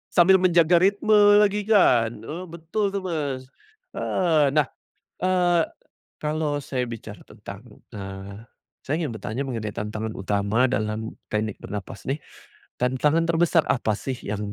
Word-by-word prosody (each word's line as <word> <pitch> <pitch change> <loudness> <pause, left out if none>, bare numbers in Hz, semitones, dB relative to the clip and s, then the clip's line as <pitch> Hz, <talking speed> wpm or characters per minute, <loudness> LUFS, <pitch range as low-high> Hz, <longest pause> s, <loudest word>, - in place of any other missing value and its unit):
Sambil 180 +2 +7
menjaga 175 -1 +5
ritme 200 +4 +3 0.2
lagi 210 0 +2
kan, 125 - +3
eee, 155 +11 -7
betul 170 +5 -2
tuh, 200 - -2
Mas, 145 -8 -3 0.5
heeh. 155 -6 +2
Nah, 150 -1 +2 0.5
eee, 180 -2 +2 0.6
kalau 150 -1 -1
saya 130 -2 -2
bicara 115 -3 -9
tentang, 100 +1 -11 0.3
eee, 100 +1 -8 0.4
saya 145 - -1
ingin 140 -9 -3
bertanya 120 +5 -4
mengenai 110 -4 -4
tantangan 110 +2 -4
utama 100 +5 +1
dalam 110 -2 -3 0.2
teknik 105 -1 -1
bernapas 100 -1 -7
nih, 140 +3 -2 0.6
tantangan 145 +6 +2
terbesar 170 0 +3
apa 110 -4 +1
sih 130 +4 -4
yang 105 0 -4
135 Hz, 130 wpm, -24 LUFS, 110-170 Hz, 0.6 s, Sambil